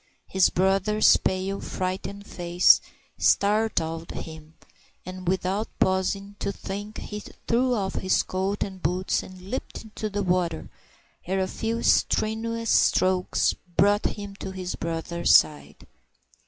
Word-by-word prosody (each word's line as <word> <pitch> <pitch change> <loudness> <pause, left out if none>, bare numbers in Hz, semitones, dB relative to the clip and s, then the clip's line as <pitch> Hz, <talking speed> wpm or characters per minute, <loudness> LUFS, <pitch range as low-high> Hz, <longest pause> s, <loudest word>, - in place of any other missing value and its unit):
His 190 -1 +3
brother's 195 +3 +3
pale, 190 +1 -2
frightened 190 +2 -4
face 175 -1 +4 0.4
startled 200 -6 +1
him, 160 0 -9 0.5
and 185 0 -8
without 190 +3 0
pausing 195 +2 0
to - - -2
think, 205 +2 -7
he 210 - -6 0.3
threw 245 +2 +2
off 195 -3 -2
his 185 - +1
coat 190 +2 -2
and 190 -2 -8
boots 180 +4 0
and 185 0 -12
leaped 260 - -5
into 215 0 -5
the 205 0 -2
water, 180 -3 -1 0.6
where 190 +2 -1
a 190 - 0
few 225 +4 -3
strenuous 230 +1 +1
strokes 185 -1 +3 0.2
brought 205 +2 +4
him 205 -1 -4
to - - -6
his 185 -1 -5
brother's 170 +1 +1
side. 75 -1 +2
190 Hz, 125 wpm, -25 LUFS, 180-205 Hz, 0.6 s, face